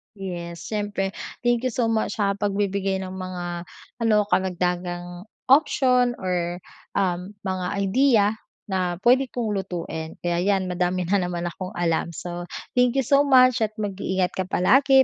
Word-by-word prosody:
Yes, 175 -3 -6
siyempre. 205 -2 -1 0.3
Thank 240 +1 +2
you 255 - -2
so 230 -2 +1
much 220 -1 0
sa 200 -2 +1
pagbibigay 195 -1 0
ng 185 - -6
mga 180 -2 -5 0.3
ano, 215 -2 +3
karagdagang 180 0 -1 0.2
option 255 -4 +4
or, 175 -1 -2 0.4
um, 185 +1 -1
mga 185 -1 -2
idea 210 +3 +3 0.4
na 185 -3 -1
puwede 260 +2 +5
kong 230 -3 -2
lutuin. 170 -4 -4
Kaya 175 0 0
'yan 195 0 +2
madami 180 +1 0
na 195 +3 +2
naman 175 -1 -3
akong 185 +1 -7
alam. 170 -1 0
So 175 0 -6 0.3
thank 250 +1 +4
you 270 - +3
so 280 +3 +5
much 255 -2 +6
at 215 0 0
mag-iingat 190 -3 -1
ka 185 -1 -3
palagi. 265 +9 +5
190 Hz, 150 wpm, -24 LUFS, 180-225 Hz, 0.4 s, much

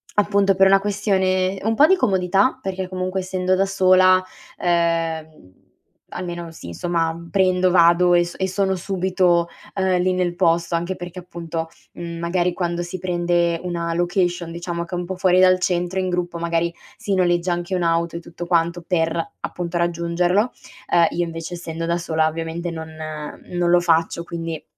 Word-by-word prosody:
appunto 200 -1 +3
per 195 0 +5
una 195 0 +5
questione 195 -2 0
un 225 +1 +1
po' 290 - +7
di 380 - +5
comodità 195 - +2
perché 190 -1 -4
comunque 185 0 -2
essendo 185 0 0
da 195 +1 +2
sola, 185 -1 +5 0.4
ehm, 165 - -1 0.6
almeno 175 -2 -5
sì, 160 - -11
insomma, 165 - -1
prendo, 185 -2 +3
vado 175 0 +5
e 175 0 +5
so 175 - -8
e 190 - 0
sono 190 0 0
subito, 180 -2 +1 0.3
ehm, 190 -2 +1
lì 185 +1 +1
nel 180 -1 -1
posto, 170 -1 +1
anche 175 +3 -2
perché 175 0 -9
appunto, 170 -2 -6 0.2
mhmm, 170 -1 -7
magari 175 +1 0
quando 175 -1 -2
si 175 +1 -6
prende 175 -1 0
una 170 -2 -2
location 175 -1 0
diciamo 170 0 -4
che 180 - -6
è - - -2
un 175 - -4
po' 190 +1 -5
fuori 185 -1 +3
dal 185 0 +5
centro, 180 0 -1
in 185 -1 -1
gruppo 175 -1 -2
magari 170 0 0 0.3
si 200 -1 -2
noleggia 175 -1 +1
anche 175 +2 -4
un'auto 170 -1 0
e - - -5
tutto 170 +1 -8
quanto 170 0 0
per, 165 -2 0 0.2
appunto, 175 -1 -4
raggiungerlo; 175 +5 +1 0.4
ehm, 170 -1 +5
io 175 +1 -1
invece 165 +1 -6
essendo 165 -1 -5
da 170 - +1
sola 160 -2 0
ovviamente 165 +2 -4
non 160 -1 -6 0.6
non 175 -1 0
lo 175 - +6
faccio, 170 0 +1
quindi 165 -2 -5
175 Hz, 170 wpm, -21 LUFS, 170-185 Hz, 0.6 s, po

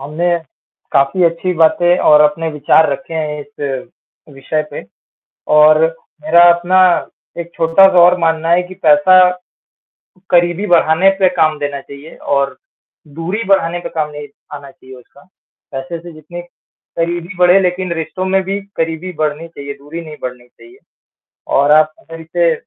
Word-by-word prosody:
हमने 165 +5 -1 0.6
काफ़ी 140 +7 +2
अच्छी 170 +2 0
बातें 175 +2 +2
और 150 0 +5
अपने 150 +2 +1
विचार 150 +1 +2
रखे 165 +3 -7
हैं 150 -2 -3
इस 145 -6 -6 0.5
विषय 155 +3 -3
पे 145 - -8 0.7
और 155 +1 +6 0.4
मेरा 170 +2 +4
अपना 175 +2 +1 0.6
एक 170 - -8
छोटा-सा 180 +3 +4
और 180 +1 +4
मानना 165 0 0
है 175 +1 +3
कि 185 +1 -11
पैसा 155 +5 +5 1.1
करीबी 175 +3 +1
बढ़ाने 175 +2 +3
पे 185 - +5
काम 155 -1 +1
देना 145 -1 -4
चाहिए 140 +4 -13 0.2
और 140 0 -1 0.6
दूरी 190 +7 -3
बढ़ाने 175 -3 +1
पे - - -6
काम 155 -2 -3
नहीं 145 0 -9 0.3
आना 140 -1 -10
चाहिए 130 0 -16
उसका। 135 +3 -19 0.5
पैसे 135 +5 -6
से 175 0 -12
जितनी 155 +3 -10 0.6
करीबी 170 +2 -3
बढ़े 180 +2 +5
लेकिन 180 -1 -2
रिश्तों 165 +3 -5
में 190 0 +1
भी 195 +2 -3 0.2
करीबी 165 +3 -3
बढ़नी 155 +2 -2
चाहिए, 140 -3 -9
दूरी 145 +4 -9
नहीं 155 -1 -10
बढ़नी 125 -1 -7
चाहिए। 360 - -19 0.8
और 140 +2 +3
आप 155 0 +3
अगर 165 0 -12
इसे 170 +1 0
165 Hz, 150 wpm, -15 LUFS, 150-175 Hz, 1.1 s, और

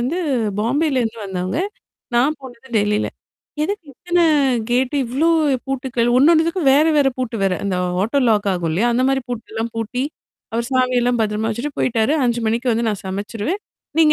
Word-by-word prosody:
வந்து 255 +8 -1 0.4
பாம்பேல 270 +4 +1
இருந்து 230 0 -3
வந்தவங்க. 185 - -2 0.6
நான் 275 +6 +3
போனது 260 0 -12
டெல்லில. 210 +1 +1 0.6
எதுக்கு 375 +1 -3
இத்தன 350 +6 -1 0.5
கேட்டு? 255 +3 +1
இவ்ளோ 265 +7 0 0.4
பூட்டுக்கள்? 255 -3 -1
ஒண்ணொண்ணுத்துக்கும் 325 +2 +4
வேற, 295 +2 +5
வேற 280 -2 +4
பூட்டு 245 -2 -2
வேற. 190 -1 +2
அந்த 195 -2 0 0.3
ஆட்டோ 230 +8 +1
லாக் 210 -2 +2
ஆகும் 170 -2 -2
இல்லயா! 220 +9 +2
அந்தமாரி 265 +3 +2
பூட்டெல்லாம் 225 0 -4
பூட்டி, 225 +3 -2 0.5
அவரு 235 +1 -1
சாவியெல்லாம் 250 -1 +2
பத்திரமா 215 0 0
வச்சுட்டு 245 +7 -3
போய்ட்டாரு. 230 +2 +1
5:00 240 -1 +1
மணிக்கு 235 +3 0
வந்து 230 +1 0
நான் 210 -2 -3
சமைச்சிருவேன். 205 - -3 0.4
நீங்க 310 -2 +6
245 Hz, 155 wpm, -20 LUFS, 220-270 Hz, 0.6 s, நீங்க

